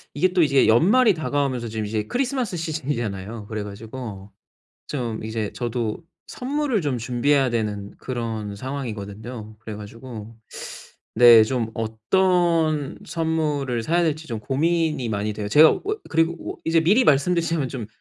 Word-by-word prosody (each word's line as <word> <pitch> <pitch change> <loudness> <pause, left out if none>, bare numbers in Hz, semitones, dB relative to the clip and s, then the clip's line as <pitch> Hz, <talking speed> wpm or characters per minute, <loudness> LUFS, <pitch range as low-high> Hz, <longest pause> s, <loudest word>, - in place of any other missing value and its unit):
이게 185 +6 +3
또 180 - +4
이제 140 -4 +4
연말이 205 - +5
다가오면서 140 -7 -1
지금 110 -1 -3
이제 105 0 -2
크리스마스 250 -7 -1
시즌이잖아요. 115 - -4
그래 110 -1 -4
가지고 105 -1 -8 0.6
좀 120 -6 -3
이제 110 -1 -3
저도 120 +1 -3 0.2
선물을 270 -3 -1
좀 145 -6 -1
준비해야 125 +3 +1
되는 105 -3 -2
그런 110 -5 -4
상황이거든요. 110 -3 -6
그래가지고 110 +1 -9 0.8
네, 120 -2 +9
좀 115 -1 -2
어떤 155 - +1
선물을 150 - -1
사야 170 +8 +1
될지 160 -1 -1
좀 115 -5 -4
고민이 155 0 0
많이 105 0 -1
돼요. 105 -1 -4
제가 155 +8 +7
어 - - -2 0.3
그리고 165 +1 +2 0.2
오 - - -29
이제 165 0 +3
미리 205 +10 +4
말씀드리자면 165 - +2
좀 120 -4 -6
130 Hz, 325 characters per minute, -23 LUFS, 110-160 Hz, 0.8 s, 네